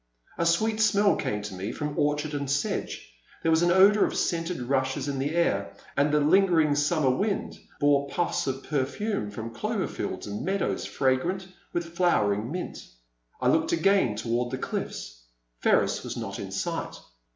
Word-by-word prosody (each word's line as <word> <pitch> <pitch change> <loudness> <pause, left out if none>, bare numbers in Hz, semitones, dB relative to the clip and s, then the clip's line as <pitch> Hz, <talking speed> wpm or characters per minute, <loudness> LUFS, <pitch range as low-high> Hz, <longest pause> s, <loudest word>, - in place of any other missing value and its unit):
A 170 - +2
sweet 215 +6 +2
smell 210 -2 +4
came 105 0 -2
to 105 -1 -6
me 95 +4 -4
from 150 +3 -4
orchard 150 0 0
and 140 -2 -3
sedge; 140 - -2 0.3
there 165 - +3
was 160 +1 +4
an 175 - +3
odour 195 +4 +6
of - - -1
scented 170 0 -1
rushes 130 +2 0
in 140 -2 -2
the 145 +4 -1
air, 170 0 0 0.2
and 145 +1 +2
the 150 - +3
lingering 160 -1 +4
summer 145 -1 +2
wind 200 +9 -2 0.2
bore 140 -1 +3
pufis 175 0 -1
of 135 0 -3
perfume 145 - -2
from 110 +3 -7
clover - - -2
fields - - -5
and 105 0 -5
meadows 195 +1 -1
fragrant 170 +8 0 0.2
with 170 -1 -4
flowering 110 - +2
mint. 180 +2 -5 0.6
I 125 - +2
looked 160 +5 +2
again 170 - +3
toward 120 +3 -1
the 130 - -3
cliff's. - - -5 0.4
Ferris - - +2
was - - -5
not - - -5
in - - -6
sight. - - -3
150 Hz, 170 wpm, -27 LUFS, 130-175 Hz, 0.6 s, odour